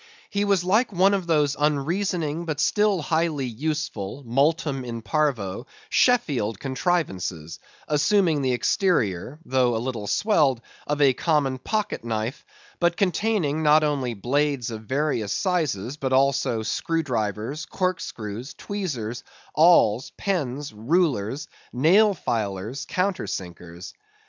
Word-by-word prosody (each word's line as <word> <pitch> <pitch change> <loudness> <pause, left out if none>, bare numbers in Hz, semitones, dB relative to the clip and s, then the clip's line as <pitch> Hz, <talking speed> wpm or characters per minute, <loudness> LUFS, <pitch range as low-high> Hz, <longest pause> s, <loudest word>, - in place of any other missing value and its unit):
He 200 0 0
was 200 -3 +2
like 215 +7 +2
one 190 +2 +4
of 190 -3 -1
those 150 -4 +2
unreasoning 160 +2 0
but 155 -3 -3
still 205 0 +2
highly 160 -4 0
useful, 135 -2 -4
multum 140 +2 +1
in 115 -2 -6
parvo, 120 -5 -1 0.2
Sheffield 135 - +2
contrivances, 130 - -2 0.3
assuming 155 +1 +2
the 130 -2 +1
exterior—though 125 - 0
a - - 0
little 115 -3 -4
swelled—of 145 - 0
a 140 -3 +5
common 140 -2 0
pocket 215 - -2
knife; 115 +3 -3 0.4
but 175 -1 +2
containing, 185 -6 +1
not 155 0 +5
only 135 -5 -1
blades 135 +2 0
of 110 -1 -7
various 135 -5 -1
sizes, 150 - -1
but 130 -3 -2
also 130 -4 +2
screw 165 +9 -1
drivers, 115 - -3
cork 185 -2 -1
screws, 110 +4 -6
tweezers, 135 - -4 0.3
awls, 135 -9 +4
pens, 145 - -2
rulers, 130 - 0 0.2
nail 190 - +4
filers, 110 - -3
countersinkers. 90 - -4
145 Hz, 115 wpm, -24 LUFS, 115-170 Hz, 0.4 s, a